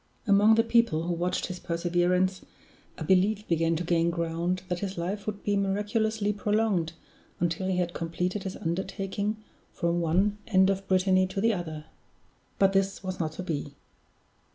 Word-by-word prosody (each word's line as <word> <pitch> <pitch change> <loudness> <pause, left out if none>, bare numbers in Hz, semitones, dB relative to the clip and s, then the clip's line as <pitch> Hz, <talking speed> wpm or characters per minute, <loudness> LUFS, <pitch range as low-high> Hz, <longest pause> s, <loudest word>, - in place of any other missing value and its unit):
Among 205 +1 +5
the 225 - +4
people 230 -9 +2
who 175 +1 -1
watched 175 +2 -1
his 180 -1 -6
perseverance, 180 +2 +1 0.6
a - - -5
belief 195 +5 +2
began 165 0 +2
to 170 - -2
gain 170 0 +2
ground 170 +2 -1
that 180 -1 -2
his 195 -1 -4
life 195 +5 -3
would 205 -1 -4
be 205 - +1
miraculously 210 +2 0
prolonged 205 -5 0 0.5
until 175 +2 -1
he 185 -1 0
had 175 -1 -1
completed 180 +4 -2
his 190 0 -5
undertaking 195 +3 -2 0.3
from 170 -1 0
one 190 +6 +1
end 190 -2 +4
of 195 0 -4
Brittany 185 0 +3
to 190 - -4
the 225 +2 +3
other. 160 -5 -5 0.7
But 195 0 +4
this 195 0 0
was 185 -1 -4
not 160 -2 -2
to 185 - -6
be. 145 -4 -4
185 Hz, 165 wpm, -28 LUFS, 170-200 Hz, 0.7 s, Among